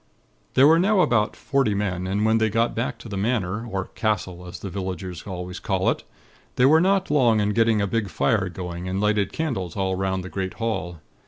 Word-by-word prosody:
"There 130 - +7
were 160 +3 +6
now 195 +2 +3
about 120 -10 +2
forty 135 -7 0
men, 95 -3 -2
and 100 +3 0
when 110 0 +3
they 110 0 +2
got 115 +3 +1
back 115 +3 -2
to - - -11
the 100 -3 -5
Manor 110 0 -1
or 95 -4 -3
castle 90 -5 -3
as 90 0 -7
the 95 - -6
villagers 95 -1 -5
always 90 -1 -6
call 95 -3 +1
it - - -5 0.5
they 125 - +4
were 155 +4 +6
not 190 -2 +2
long 120 -7 +4
in 105 0 +1
getting 115 -1 +3
a - - +2
big 105 0 -1
fire 100 -2 +1
going, 90 0 -6
and 95 +1 -2
lighted 105 -1 +1
candles 105 - -3
all 95 -1 0
'round 95 0 -1
the 95 - -7
great 95 -1 -4
hall. 90 -8 -3
105 Hz, 215 wpm, -24 LUFS, 95-115 Hz, 0.5 s, There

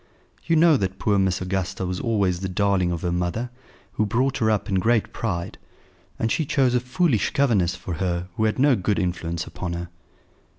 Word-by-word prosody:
You 165 - +3
know 160 -2 +6
that 95 -4 -2
poor 100 -2 +1
Miss 95 -1 +1
Augusta 95 0 -2
was 90 0 -3
always 100 -6 +1
the 95 0 -3
darling 95 -1 +1
of 85 0 -4
her 90 - 0
mother, 90 +8 -2 0.4
who 110 - 0
brought 130 +5 0
her 110 -3 +2
up 105 -2 0
in 95 -3 +1
great 115 +2 +1
pride; 85 -7 -3 0.6
and 115 - -1
she 160 - +1
chose 135 -3 +2
a 125 - +3
foolish 125 - +1
governess 100 -10 +2
for 90 - -6
her 90 +1 -2
who 110 - +1
had 110 - 0
no 135 0 +4
good 100 0 0
influence 85 -1 -2
upon 90 -2 -5
her." 85 0 -5
100 Hz, 200 wpm, -24 LUFS, 90-120 Hz, 0.6 s, know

